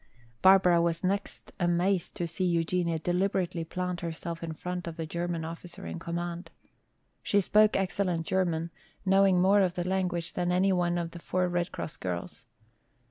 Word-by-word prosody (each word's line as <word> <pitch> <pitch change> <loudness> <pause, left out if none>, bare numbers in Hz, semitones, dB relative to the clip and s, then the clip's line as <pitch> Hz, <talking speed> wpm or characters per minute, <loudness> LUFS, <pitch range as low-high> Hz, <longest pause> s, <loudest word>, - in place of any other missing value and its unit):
Barbara 185 -3 +6
was 170 +1 0
next 195 +2 -2
amazed 175 +1 +1
to 175 - -2
see 170 +3 -3
Eugenia 170 -1 +1
deliberately 180 0 0
plant 180 +1 -3
herself 170 0 -5
in 165 -1 -4
front 180 +2 -5
of 165 0 -6
the 165 - -3
German 170 0 -3
officer 175 +3 -8
in - - -5
command. 170 +1 -4 0.7
She 205 - +2
spoke 210 +2 +4
excellent 185 -3 -1
German, 170 -3 0 0.3
knowing 195 -1 +5
more 195 +3 +5
of 180 -2 +1
the 175 0 -2
language 180 -3 -1
than 175 0 0
any 190 +2 +3
one 175 -1 +1
of 170 -1 -3
the 170 - -9
four 180 +2 0
Red 175 0 -1
Cross 155 - -6
girls. 90 -2 -5
175 Hz, 165 wpm, -29 LUFS, 170-185 Hz, 0.7 s, Barbara